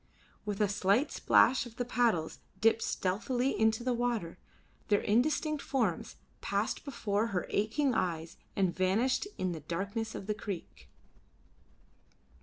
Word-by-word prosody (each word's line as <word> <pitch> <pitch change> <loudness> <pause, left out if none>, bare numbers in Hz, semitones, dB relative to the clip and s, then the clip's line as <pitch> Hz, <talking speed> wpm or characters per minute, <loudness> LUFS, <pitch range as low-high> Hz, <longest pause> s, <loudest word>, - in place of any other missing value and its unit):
With 205 -1 -2
a 210 - +4
slight 200 +7 +2
splash 255 -1 +4
of 230 - -14
the 245 - -2
paddles 225 -10 +1 0.2
dipped 225 +1 +4
stealthily 245 +8 0
into 220 +1 +2
the 255 0 +1
water, 235 -8 -2 0.5
their 205 -1 +3
indistinct 300 +6 +1
forms 225 -11 -1 0.3
passed - - -1
before 220 -6 -1
her 190 -5 -2
aching 245 +7 +1
eyes 165 -4 -2 0.2
and 190 -3 +1
vanished 215 - +1
in 185 -1 -1
the 165 - -4
darkness 200 +8 -3
of - - -6
the 210 - 0
creek. 200 -4 -7
215 Hz, 135 wpm, -31 LUFS, 190-245 Hz, 0.5 s, a